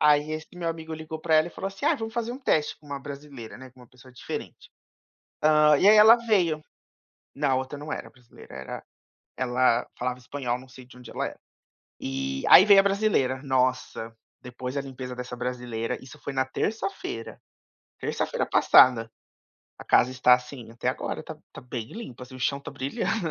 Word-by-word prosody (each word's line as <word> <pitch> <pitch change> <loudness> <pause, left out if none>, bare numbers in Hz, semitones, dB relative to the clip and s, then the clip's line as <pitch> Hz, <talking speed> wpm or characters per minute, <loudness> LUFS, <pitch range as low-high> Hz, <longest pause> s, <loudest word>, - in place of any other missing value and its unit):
Aí 150 0 +4
esse 155 0 -5
meu 170 -2 -3
amigo 160 -1 -5
ligou 160 0 -6
pra 160 -1 +1
ela 155 +2 +4
e - - -7
falou 195 - -4
assim, 195 0 -5
ah, - - +4
vamos 225 0 -6
fazer 235 0 -2
um 260 - -7
teste 155 - 0
com 150 - -20
uma 140 -1 -5
brasileira, 140 -4 -9
né, 130 0 -12
com 130 - -21
uma 125 - -15
pessoa 130 0 -18
diferente. - - -8 0.7
Hã. 150 -1 +5
E 200 - +4
aí 215 - +8
ela 220 +2 +9
veio. 190 -10 +1 0.7
Não 140 -1 +1
a - - +3
outra 130 +2 -3
não 150 +1 -5
era - - -6
brasileira, 125 -2 -16
era 65 - -7 0.5
ela 125 -1 +2
falava 125 0 -2
espanhol, 125 -1 -3
eu - - -11
não 130 - -15
sei 125 -1 -14
de 125 - -17
onde 120 -2 -12
ela - - -2
era. - - -9 0.6
Eh, 65 0 -3
aí 190 - +10
veio 200 -2 +8
a - - +3
brasileira, 195 -11 +1
nossa, 125 -4 -1 0.3
depois 125 +1 -6
da 140 - -1
limpeza 130 -2 -7
dessa 125 0 -7
brasileira, 120 -2 -3
isso 130 - -13
foi 140 - -5
na 130 0 +1
terça-feira. 190 - -4 0.6
Terça-feira - - -2
passada, 115 -3 +5 0.7
a - - -10
casa 125 - +4
está, 125 -1 +5
assim, 125 -2 -6
até 115 - -3
agora - - -3
tá - - -9 0.2
tá - - -10
bem 120 -3 -6
limpa, 130 - -9
assim, 130 0 -12
o - - -12
chão 140 +1 0
tá - - -8
brilhando. 165 - -2
130 Hz, 200 wpm, -26 LUFS, 125-160 Hz, 0.7 s, aí